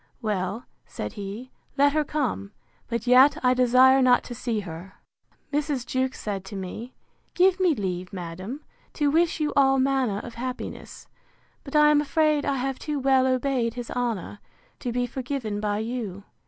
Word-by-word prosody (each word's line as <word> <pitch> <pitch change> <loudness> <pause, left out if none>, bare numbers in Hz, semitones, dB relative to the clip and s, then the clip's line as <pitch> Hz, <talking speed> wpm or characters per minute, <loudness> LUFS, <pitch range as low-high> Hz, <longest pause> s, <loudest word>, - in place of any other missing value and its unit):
Well, 205 +1 -2 0.2
said - - -6
he, 210 +5 -7 0.3
let 285 +1 +4
her 305 0 +2
come: 260 -9 -3 0.3
but 235 -1 -3
yet 255 +3 +6
I 250 - +5
desire 255 +1 +5
not 250 -1 +4
to 245 - -7
see 235 -3 -2
her. 175 +1 -9 0.6
Mrs. 285 -4 -1
Jewkes 260 +1 -1
said 200 -3 -4
to 200 - -8
me, 195 +6 -7 0.4
Give 370 +1 +4
me 360 -5 +3
leave, 185 -4 -3
madam, 185 - -6 0.3
to 290 -2 +1
wish 330 +1 +2
you 300 -1 0
all 270 -1 +4
manner 260 -5 +1
of 235 +3 -7
happiness: 250 +2 -7 0.6
But 275 - -8
I 300 0 +6
am 295 -1 +4
afraid 305 0 +1
I 280 -1 +1
have 265 +1 -2
too 300 -2 -3
well 265 -1 +3
obeyed 255 -2 0
his 245 -1 -6
honour, 230 -5 -3 0.4
to 245 - -3
be 245 +1 0
forgiven 245 -4 -4
by 205 -1 -1
you. 220 -4 -4
250 Hz, 170 wpm, -25 LUFS, 210-275 Hz, 0.6 s, yet